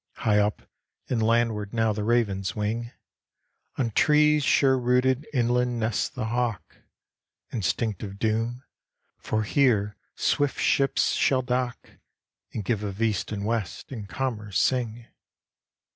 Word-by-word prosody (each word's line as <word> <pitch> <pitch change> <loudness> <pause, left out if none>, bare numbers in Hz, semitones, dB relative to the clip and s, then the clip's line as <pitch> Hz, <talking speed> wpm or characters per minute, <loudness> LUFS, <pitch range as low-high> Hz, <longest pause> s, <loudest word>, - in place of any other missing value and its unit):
High 105 -1 +2
up 105 0 0 0.5
and 120 -3 0
landward 110 -2 +1
now 110 -1 +2
the 105 0 -3
ravens 100 -4 0
wing, 110 +3 -2 0.9
On 120 -4 0
trees 150 +4 +4
sure 135 -1 +4
rooted 125 +3 +2
inland 125 -1 +1
nests 110 -1 0
the - - -4
hawk; 120 -1 -2 0.8
Instinct 110 0 -1
of 100 -2 -6
doom! 115 +4 -1 0.6
for 110 0 -1
here 105 -4 +2 0.2
swift 145 -2 0
ships 135 0 +2
shall 130 -2 +2
dock, 125 -1 -2 0.6
And 105 - -5
give 110 0 0
of 100 -1 -5
east 110 -3 0
and 100 -1 -3
west, 110 -1 -3
and 105 -6 -7
commerce 110 -7 -2
sing. 120 -3 0
115 Hz, 130 wpm, -26 LUFS, 105-125 Hz, 0.9 s, trees